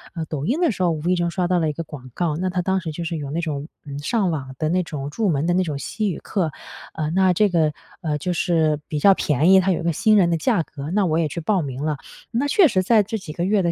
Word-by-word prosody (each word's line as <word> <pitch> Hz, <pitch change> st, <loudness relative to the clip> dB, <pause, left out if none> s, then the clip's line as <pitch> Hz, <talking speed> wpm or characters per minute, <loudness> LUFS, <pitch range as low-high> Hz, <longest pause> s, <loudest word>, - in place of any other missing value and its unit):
呃， 165 Hz, -, -3 dB
抖 150 Hz, -2 st, -3 dB
音 260 Hz, -, 0 dB
的 335 Hz, -, +3 dB
时 190 Hz, -3 st, -2 dB
候 175 Hz, -, +3 dB
无 155 Hz, -, -3 dB
意 185 Hz, -, +3 dB
中 175 Hz, -1 st, 0 dB
刷 180 Hz, -1 st, 0 dB
到 180 Hz, 0 st, +2 dB
了 160 Hz, -, +1 dB
一 150 Hz, -, -2 dB
个 165 Hz, -, -5 dB
广 130 Hz, -5 st, -11 dB
告， 165 Hz, -1 st, -1 dB
那 185 Hz, +1 st, -1 dB
它 180 Hz, 0 st, 0 dB
当 190 Hz, +1 st, +1 dB
时 165 Hz, -4 st, -5 dB
就 170 Hz, +3 st, -5 dB
是 165 Hz, -1 st, -3 dB
有 145 Hz, -2 st, -5 dB
那 170 Hz, +2 st, -1 dB
种， 150 Hz, -2 st, -4 dB, 0.2 s
嗯， 140 Hz, -1 st, -6 dB
上 200 Hz, +3 st, 0 dB
网 135 Hz, -4 st, -5 dB
的 155 Hz, -, 0 dB
那 180 Hz, +2 st, +1 dB
种 145 Hz, -4 st, -5 dB
入 205 Hz, +6 st, 0 dB
门 145 Hz, -1 st, 0 dB
的 175 Hz, -, +2 dB
那 185 Hz, -, +3 dB
种 155 Hz, -5 st, -3 dB
西 215 Hz, +8 st, -2 dB
语 -, -, -5 dB
课。 180 Hz, -6 st, -2 dB, 0.4 s
呃， 155 Hz, -1 st, -2 dB
那 185 Hz, 0 st, +3 dB
这 205 Hz, +3 st, +3 dB
个， 160 Hz, -4 st, +2 dB, 0.3 s
呃， 155 Hz, -4 st, -1 dB
就 180 Hz, +5 st, -2 dB
是 160 Hz, -4 st, +1 dB
比 150 Hz, -, -2 dB
较 195 Hz, +5 st, +6 dB
便 150 Hz, +3 st, +2 dB
宜， 190 Hz, -, +8 dB
它 190 Hz, +1 st, +2 dB
有 170 Hz, -, -1 dB
个 170 Hz, -, +1 dB
新 215 Hz, +7 st, +3 dB
人 175 Hz, -3 st, +4 dB
的 165 Hz, -, +1 dB
价 165 Hz, -, +1 dB
格， 150 Hz, +1 st, -7 dB
那 200 Hz, -1 st, +2 dB
我 160 Hz, -1 st, +1 dB
也 165 Hz, -, +1 dB
去 165 Hz, +3 st, -5 dB
报 190 Hz, +2 st, +1 dB
名 135 Hz, -1 st, -5 dB
了。 155 Hz, -1 st, -1 dB, 0.3 s
那 245 Hz, +5 st, 0 dB
确 345 Hz, +3 st, +5 dB
实 190 Hz, -6 st, +1 dB
在 220 Hz, +3 st, +5 dB
这 220 Hz, +3 st, -4 dB
几 165 Hz, -6 st, -8 dB
个 170 Hz, -, -3 dB
月 200 Hz, +1 st, +2 dB
的 170 Hz, -, +2 dB
170 Hz, 325 characters per minute, -22 LUFS, 150-190 Hz, 0.4 s, 宜